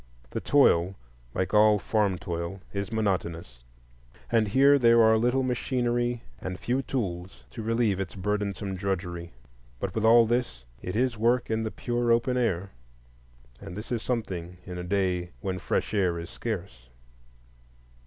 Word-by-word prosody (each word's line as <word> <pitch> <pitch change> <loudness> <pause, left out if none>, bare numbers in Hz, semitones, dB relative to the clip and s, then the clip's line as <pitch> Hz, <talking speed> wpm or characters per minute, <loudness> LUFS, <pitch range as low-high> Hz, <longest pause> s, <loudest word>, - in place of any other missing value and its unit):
The - - -3
toil, 95 -10 +4 0.4
like 95 - -1
all 105 0 +6
farm 100 -1 +1
toil, 85 0 -4
is 100 0 -3
monotonous, 85 - -2 0.7
and 115 -2 +3
here 140 +6 +5
there 115 -2 +6
are 110 0 +6
little 125 +4 +2
machinery 120 -1 -1 0.2
and 95 -1 -5
few 125 +3 0
tools 95 -9 -4
to 115 - -6
relieve 115 -3 +1
its 95 -1 -4
burdensome 100 0 -2
drudgery. 90 -3 -3 0.5
But 95 +4 -3
with 110 - -1
all 115 +1 +7
this, 120 - -1 0.2
it 90 - -5
is 120 -1 +1
work 120 +1 +2
in 110 0 +1
the 110 - -2
pure 120 +1 -1
open 120 +2 +2
air, 100 -6 0 0.9
and 95 -1 -8
this 105 - -7
is 120 -3 0
something 90 -8 -3
in 90 -1 -6
a - - -4
day 90 -2 -1
when 95 -1 -3
fresh - - -1
air 90 -5 +1
is 85 +1 -7
scarce. 90 - -5
105 Hz, 155 wpm, -27 LUFS, 90-120 Hz, 0.9 s, all